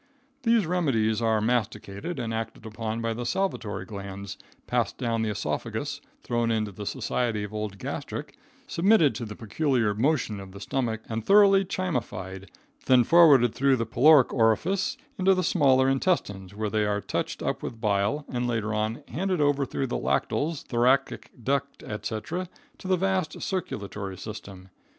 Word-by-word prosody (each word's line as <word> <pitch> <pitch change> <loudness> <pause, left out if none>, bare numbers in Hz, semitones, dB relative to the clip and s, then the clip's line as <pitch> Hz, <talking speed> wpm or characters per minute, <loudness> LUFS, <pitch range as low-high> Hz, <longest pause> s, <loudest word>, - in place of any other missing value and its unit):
These 230 -5 +3
remedies 125 -11 +1
are 110 -1 +2
masticated 110 - -2
and 115 -2 -3
acted 115 0 -5
upon 110 +1 -4
by 115 0 -1
the 120 +2 -4
salivary 120 - -2
glands, 100 -1 -7 0.3
passed - - -1
down 115 -2 -1
the 110 - 0
esophagus, 75 -8 -3 0.2
thrown 120 -1 0
into 110 -2 0
the 100 +1 -7
society 120 -3 -1
of 105 +1 -7
old 105 -2 -4
gastric, - - -5 0.3
submitted 175 -5 +4
to 120 - -5
the 105 -1 -7
peculiar 115 -1 0
motion 115 -2 0
of 95 -1 -10
the 100 - -9
stomach 115 -1 -2
and 110 -1 -3
thoroughly 195 - +6
chymified, 100 - -4 0.4
then 125 -2 +6
forwarded 145 -7 +6
through 135 0 +3
the 115 -2 -1
pyloric 140 +4 +5
orifice 135 - +1 0.2
into 190 +1 +4
the 185 - 0
smaller 135 -6 +4
intestines, 100 - 0
where 105 -1 -2
they 110 -1 +1
are 105 0 0
touched - - -3
up - - -1
with 115 - -6
bile, 105 +7 0
and 125 -1 -2
later 110 -2 -1
on 110 +5 -2
handed 185 +1 -1
over 145 -2 +2
through 135 - -2
the 125 - -2
lacteals, 140 - -1
thoracic 130 +3 +1
duct, 140 +3 -1
etc., 110 +12 -4 0.3
to - - -8
the 185 -1 +3
vast 190 -2 -1
circulatory 100 - -4
system. 100 -3 -9
115 Hz, 160 wpm, -27 LUFS, 105-145 Hz, 0.4 s, thoroughly